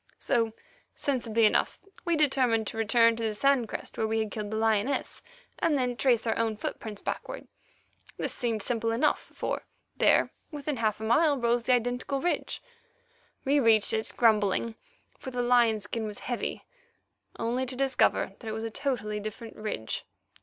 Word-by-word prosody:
So, 230 -4 +1 0.4
sensibly 230 -5 +1
enough, 215 - +2 0.3
we 340 -1 +2
determined 260 -7 +3
to 225 - -5
return 230 +1 +4
to 230 - -3
the 220 -1 -1
sand 260 -1 +2
crest - - -6
where 220 - +1
we 220 +1 0
had 220 -2 -1
killed 210 -2 -4
the 220 - -2
lioness, 225 +4 0 0.4
and 320 -4 +2
then 250 -2 0
trace 240 -3 +2
our 225 - +1
own 225 -2 0
footprints 210 -1 -5
backward. - - -5 0.7
This - - -3
seemed 230 -4 -1
simple 230 -1 0
enough, 230 +2 +1
for - - -3 0.3
there, - - +4 0.2
within 295 -2 -3
half 215 -2 0
a - - -6
mile, 285 +6 +4
rose 235 -1 +1
the 255 - +4
identical 245 +3 0
ridge. 350 +5 -1 0.8
We 285 +2 +4
reached 225 -5 +4
it, 220 0 -1
grumbling, 220 -1 +3 0.5
for - - -6
the 250 -1 -2
lion 240 -3 +4
skin 220 +1 -4
was 210 - -6
heavy, 245 -1 -3 0.7
only 245 +3 -1
to 255 - -5
discover 270 0 +2
that 230 - -10
it 220 - -2
was 220 +1 -4
a 225 - -3
totally 225 -5 -2
different 215 +2 -7
ridge. 210 - -4
230 Hz, 170 wpm, -28 LUFS, 220-255 Hz, 0.8 s, return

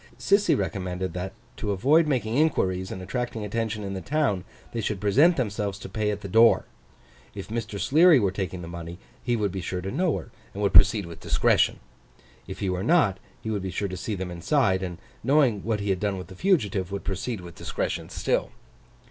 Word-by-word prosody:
Sissy 200 +1 +3
recommended 95 -1 -3
that, 90 +1 -4 0.2
to 105 - -3
avoid 145 - +3
making 120 -6 0
inquiries 95 - +1
and 95 - -6
attracting 115 +1 -3
attention 110 0 -2
in 100 -1 -4
the 95 - -4
town, 125 - 0 0.3
they 115 - -3
should 105 -2 -2
present 140 - +4
themselves 105 -5 -2
to 100 - -8
pay 105 -1 -1
at 105 -1 -3
the 100 - -6
door. 115 +4 +5 0.7
If 100 +1 -7
Mr. 110 -2 -4
Sleary 155 - +6
were 100 -4 +1
taking 95 -2 -4
the - - -7
money, 85 0 -7 0.2
he 120 -1 0
would 105 -4 0
be 95 0 -4
sure 90 +2 -3
to 95 +2 -4
know 175 +1 +1
her, - - -9 0.2
and 105 - -3
would 100 - +1
proceed 100 0 +6
with 85 -1 -10
discretion. - - +2 0.7
If - - -8
he 100 - 0
were 90 0 -2
not, 110 - +3 0.2
he 110 - -3
would 105 -2 -1
be 95 - -4
sure 100 +3 -2
to 95 - -5
see 105 +3 -3
them 95 -1 -5
inside; 95 - +1
and, 90 -2 -4 0.3
knowing 130 -6 +3
what 110 -2 -1
he 100 -1 0
had 95 - 0
done 100 -1 -1
with 90 - -8
the 95 - -10
fugitive, 100 - +1
would 100 0 -4
proceed 100 +4 -3
with 85 -1 -10
discretion - - -3
still. - - -1
100 Hz, 210 wpm, -26 LUFS, 95-115 Hz, 0.7 s, Sleary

